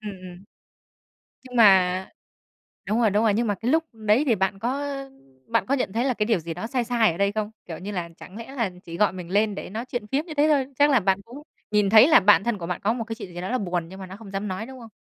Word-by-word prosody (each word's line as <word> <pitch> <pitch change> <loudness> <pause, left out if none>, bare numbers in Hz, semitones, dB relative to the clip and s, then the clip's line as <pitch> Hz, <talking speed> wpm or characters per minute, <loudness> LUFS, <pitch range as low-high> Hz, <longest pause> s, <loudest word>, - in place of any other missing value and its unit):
Ừm, 210 -1 -6
ừm. 185 0 -11 1.0
Nhưng 250 -1 -11
mà 190 -3 +5 0.8
đúng 220 +3 +1
rồi, 220 - +4
đúng 210 +3 +1
rồi. 215 -2 +3
Nhưng 230 +2 0
mà 205 - 0
cái 235 +6 -2
lúc 320 +1 +3
đấy 220 +4 +2
thì 235 -6 +3
bạn 190 +1 -1
có, 240 +4 -1
ơ, 275 -1 -5 0.4
bạn 230 0 +1
có 275 - -1
nhận 230 -7 -2
thấy 235 +3 0
là 260 - +1
cái 215 -2 -1
điều 220 -5 +1
gì 165 0 -6
đó 225 - -5
sai 250 -1 -1
sai 230 -5 +2
ở 165 - -7
đây 200 0 +2
không? 215 0 -3
Kiểu, 165 -2 -7
như 200 +3 -6
là 175 -3 -4
chẳng 190 +4 -12
lẽ 230 +3 -9
là 230 -6 0
chỉ 170 0 -8
gọi 210 - +2
mình 180 -2 -8
lên 205 +1 +1
để - - -7
nói 225 +5 -5
chuyện 240 -4 -5
phiếm 280 +7 -1
như 315 - -7
thế 300 +1 +3
thôi? 275 -1 0
Chắc 290 +1 +6
là 260 - +5
bạn 195 0 +1
cũng 255 +5 -11 0.3
nhìn 210 -2 +3
thấy 220 +5 +8
là 320 - +7
bạn 200 -2 +5
thân 235 -3 -1
của 170 - -6
bạn 180 - -4
có 220 +3 +1
một 235 -2 -3
cái 225 0 -6
chuyện 185 -6 -9
gì 175 - -5
đó 185 - -4
là 255 - 0
buồn 175 -4 -3
nhưng 190 +1 -11
mà 190 - -7
nó 190 - -9
không 210 -3 -12
dám 200 +1 -3
nói, 190 +4 -4
đúng 260 0 -11
không? 230 -1 -12
215 Hz, 300 wpm, -24 LUFS, 190-240 Hz, 1.0 s, thấy